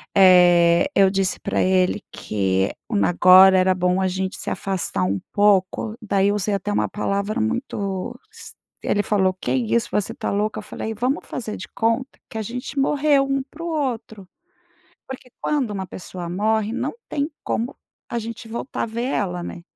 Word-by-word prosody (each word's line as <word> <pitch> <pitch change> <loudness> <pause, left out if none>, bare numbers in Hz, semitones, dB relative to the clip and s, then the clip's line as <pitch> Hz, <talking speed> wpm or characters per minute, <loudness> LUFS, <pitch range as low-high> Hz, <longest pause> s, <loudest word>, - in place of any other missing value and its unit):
Eh, 175 +2 +6
eu 195 -1 +6
disse 195 -1 0
para - - -1
ele 185 +2 +2
que, 95 -2 -1 0.2
hum, 210 -3 +1
agora 185 +2 +7
era 185 0 +3
bom 180 +1 +1
a 190 - +2
gente 190 +1 -3
se - - -4
afastar 190 - -2
um 95 +1 0
pouco. 205 +1 +2
Daí 200 -2 +2
eu 205 - +1
usei 205 0 -1
até 200 +2 -3
uma - - +1
palavra 205 +3 -2
muito 210 -5 -3
es 460 0 -11 0.3
Ele 205 0 0
falou: 190 -3 +2
"Que 185 - -4
é - - +2
isso? 235 -1 0
Você 210 - -1
tá - - -3
louca?" 210 +2 -1
Eu - - -8
falei 220 - -5
"Vamos 250 +8 -2
fazer 220 -4 -5
de 180 - -8
conta 230 +4 0
que 220 - -7
a - - -1
gente 250 +5 -5
morreu 280 0 +3
um 275 -1 0
para 300 +4 -11
o 340 - -3
outro." 245 - -3 0.8
Porque 255 -1 -9
quando 285 -6 0
uma 190 -2 -4
pessoa 180 -1 -8
morre, 215 +3 0
não 260 +4 -2 0.2
tem 290 +1 -1
como 235 +4 -2 0.4
a 235 - 0
gente 230 +2 -7
voltar 235 +4 -4
a - - +1
ver 230 +2 -4
ela, 180 -9 -1
né. 170 - -7
205 Hz, 185 wpm, -22 LUFS, 185-240 Hz, 0.8 s, agora